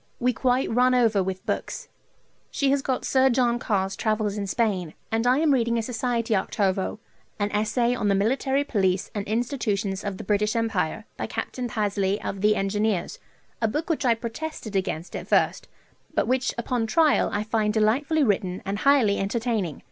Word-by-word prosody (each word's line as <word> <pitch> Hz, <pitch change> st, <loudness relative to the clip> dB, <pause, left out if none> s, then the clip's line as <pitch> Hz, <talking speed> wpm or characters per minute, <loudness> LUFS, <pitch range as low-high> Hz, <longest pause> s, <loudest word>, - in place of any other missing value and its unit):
We 250 Hz, +1 st, +2 dB
quite 255 Hz, +2 st, +1 dB
run 250 Hz, +2 st, +4 dB
over 225 Hz, -5 st, +3 dB
with 185 Hz, 0 st, -4 dB
books. -, -, -3 dB, 0.6 s
She 275 Hz, -1 st, +1 dB
has 280 Hz, 0 st, +2 dB
got 260 Hz, -1 st, -2 dB
Sir 265 Hz, 0 st, +4 dB
John 240 Hz, -1 st, +2 dB
Carr's 195 Hz, -4 st, -1 dB
"Travels 215 Hz, -1 st, 0 dB
in 200 Hz, -1 st, -3 dB
Spain," 190 Hz, -6 st, -1 dB, 0.2 s
and 225 Hz, +2 st, +1 dB
I 250 Hz, +2 st, +4 dB
am 305 Hz, -1 st, +3 dB
reading 235 Hz, -2 st, +1 dB
a 230 Hz, -, 0 dB
Society 230 Hz, -1 st, -1 dB
octavo, 190 Hz, +1 st, -1 dB, 0.4 s
an 205 Hz, 0 st, -1 dB
"Essay 220 Hz, +3 st, +1 dB
on 225 Hz, -4 st, -1 dB
the 200 Hz, -, +3 dB
Military 265 Hz, +7 st, +1 dB
Police 190 Hz, -8 st, 0 dB
and 205 Hz, -2 st, -4 dB
Institutions 215 Hz, -4 st, -1 dB
of 200 Hz, -2 st, -4 dB
the -, -, -7 dB
British 210 Hz, +2 st, +1 dB
Empire," 220 Hz, -3 st, -1 dB
by -, -, -3 dB
Capt. -, -, -5 dB
Pasley 205 Hz, -3 st, 0 dB
of 195 Hz, -, -5 dB
the 210 Hz, +1 st, +4 dB
Engineers, 205 Hz, -, -1 dB, 0.4 s
a 225 Hz, -, +3 dB
book 300 Hz, +9 st, -2 dB
which 315 Hz, -, -1 dB
I 240 Hz, -3 st, +4 dB
protested 230 Hz, -1 st, -6 dB
against 185 Hz, -3 st, -2 dB
at -, -, -6 dB
first, -, -, +1 dB, 0.5 s
but -, -, +1 dB
which 255 Hz, 0 st, 0 dB
upon 235 Hz, -1 st, -1 dB
trial 310 Hz, +6 st, +3 dB
I 205 Hz, -, -1 dB
find 215 Hz, -1 st, 0 dB
delightfully 255 Hz, +9 st, +2 dB
written 190 Hz, -5 st, 0 dB
and 200 Hz, +1 st, -2 dB
highly 260 Hz, -7 st, +4 dB
entertaining. 210 Hz, -, -1 dB
220 Hz, 180 wpm, -25 LUFS, 200-250 Hz, 0.6 s, run